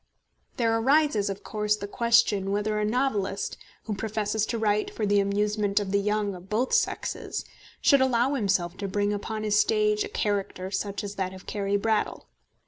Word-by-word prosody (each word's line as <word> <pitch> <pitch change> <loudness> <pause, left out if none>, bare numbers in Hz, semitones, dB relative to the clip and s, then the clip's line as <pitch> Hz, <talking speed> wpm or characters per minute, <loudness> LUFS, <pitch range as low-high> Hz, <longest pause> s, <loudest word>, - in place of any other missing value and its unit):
There 230 -2 +2
arises, 265 -3 +3
of 195 0 -5
course, 210 -1 0
the 200 -1 -6
question 230 -3 +2
whether 210 +1 0
a 210 - +1
novelist, 210 -4 -1 0.3
who 220 - -3
professes 215 +1 -1
to 235 - -2
write 210 -1 +1
for 215 - -2
the 205 0 +3
amusement 205 +1 +1
of 200 -2 -3
the 200 - +3
young 210 0 0
of 180 +1 -11
both 235 +5 0
sexes, 465 - -1 0.4
should 280 -2 +5
allow 255 +1 +2
himself 190 -8 0
to 200 - -3
bring 205 +1 0
upon 215 +1 -4
his 210 -1 +3
stage 425 - +2
a 415 - -6
character 200 - -2
such 200 +1 -3
as 200 -1 -5
that 190 -1 -2
of 185 - -13
Carry 200 -1 -1
Brattle. 220 +1 -1
210 Hz, 180 wpm, -27 LUFS, 200-225 Hz, 0.4 s, should